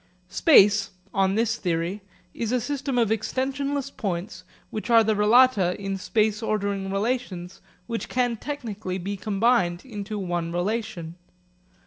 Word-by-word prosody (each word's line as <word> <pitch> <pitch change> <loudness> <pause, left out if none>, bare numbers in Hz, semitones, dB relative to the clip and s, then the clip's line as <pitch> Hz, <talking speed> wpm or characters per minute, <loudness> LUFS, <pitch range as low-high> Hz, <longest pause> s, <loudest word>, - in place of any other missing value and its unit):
Space, 205 - +5 0.2
on 195 0 +2
this 225 +1 +1
theory, 175 +2 -2 0.3
is 230 -1 -3
a 250 - +2
system 270 +1 -2
of 230 -3 +3
extensionless 275 +5 -2
points 185 -2 -4 0.3
which 215 +3 -5
are 230 -1 +7
the 220 0 +2
relata 210 -3 +4
in 195 -1 -4
space 215 +2 0
ordering 200 -3 -1
relations 195 -4 -3 0.2
which 230 -1 -4
can 245 -2 +1
technically 220 -8 -5
be 195 +2 -4
combined 195 -3 +1
into 210 -3 -5
one 175 -3 -2
relation. 175 -3 -3
210 Hz, 130 wpm, -25 LUFS, 190-240 Hz, 0.3 s, are